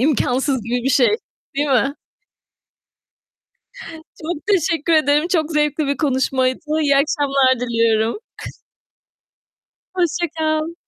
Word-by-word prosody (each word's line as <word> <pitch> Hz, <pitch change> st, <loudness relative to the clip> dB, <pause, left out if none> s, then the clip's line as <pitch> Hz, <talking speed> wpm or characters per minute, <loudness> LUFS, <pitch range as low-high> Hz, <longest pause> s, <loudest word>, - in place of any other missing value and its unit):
imkânsız 260 Hz, -2 st, +1 dB
gibi 240 Hz, +2 st, -2 dB
bir 270 Hz, -, +1 dB
şey, 270 Hz, -, +3 dB, 0.4 s
değil 290 Hz, +1 st, 0 dB
mi? 270 Hz, +1 st, +2 dB, 2.3 s
Çok 310 Hz, -1 st, -5 dB
teşekkür 335 Hz, -4 st, +1 dB
ederim. 300 Hz, +1 st, +3 dB
Çok 330 Hz, -3 st, 0 dB
zevkli 300 Hz, 0 st, 0 dB
bir 280 Hz, 0 st, -1 dB
konuşmaydı. 260 Hz, -2 st, 0 dB, 0.2 s
İyi 285 Hz, -2 st, +3 dB
akşamlar 275 Hz, -3 st, +2 dB
diliyorum. 230 Hz, -, +1 dB, 1.8 s
Hoşça 350 Hz, -1 st, 0 dB
kal. 310 Hz, +1 st, -1 dB
285 Hz, 100 wpm, -19 LUFS, 260-315 Hz, 2.3 s, şey